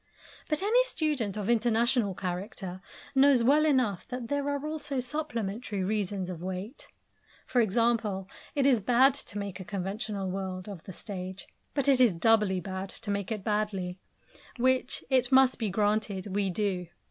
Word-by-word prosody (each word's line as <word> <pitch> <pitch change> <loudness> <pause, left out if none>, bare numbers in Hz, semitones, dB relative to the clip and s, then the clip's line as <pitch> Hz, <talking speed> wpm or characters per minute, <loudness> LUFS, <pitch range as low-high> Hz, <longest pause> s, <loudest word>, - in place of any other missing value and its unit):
But 305 +4 0
any 475 +5 +4
student 295 - -1
of 205 -2 -3
international 235 -2 +2
character 185 0 -5 0.3
knows 270 -3 +5
well 295 +5 +5
enough 250 - +1
that 245 -2 -5
there 285 0 0
are 285 0 -2
also 295 -3 -3
supplementary 235 -7 -3
reasons 200 -2 -1
of 180 -3 -6
weight. 190 - -6 0.6
For 245 - +2
example, 215 -3 +1 0.3
it 280 -2 +2
is 260 -4 +5
bad 250 +6 +5
to 245 -6 -6
make 200 -2 -4
a - - -5
conventional 200 +1 -3
world 185 -1 -4
of 195 -5 -7
the - - -7
stage, 185 0 -6 0.3
but 280 -1 +1
it 270 -2 +5
is 230 -8 +5
doubly 210 0 +3
bad 190 +2 -5
to 205 - -5
make 200 +1 -2
it 210 -3 -3
badly 200 -4 -1 0.6
which, 255 +1 +1
it 255 -1 +3
must 265 -1 +5
be 220 -3 0
granted, 205 -1 0
we 200 -1 +1
do. 185 -2 -1
215 Hz, 160 wpm, -29 LUFS, 190-255 Hz, 0.6 s, knows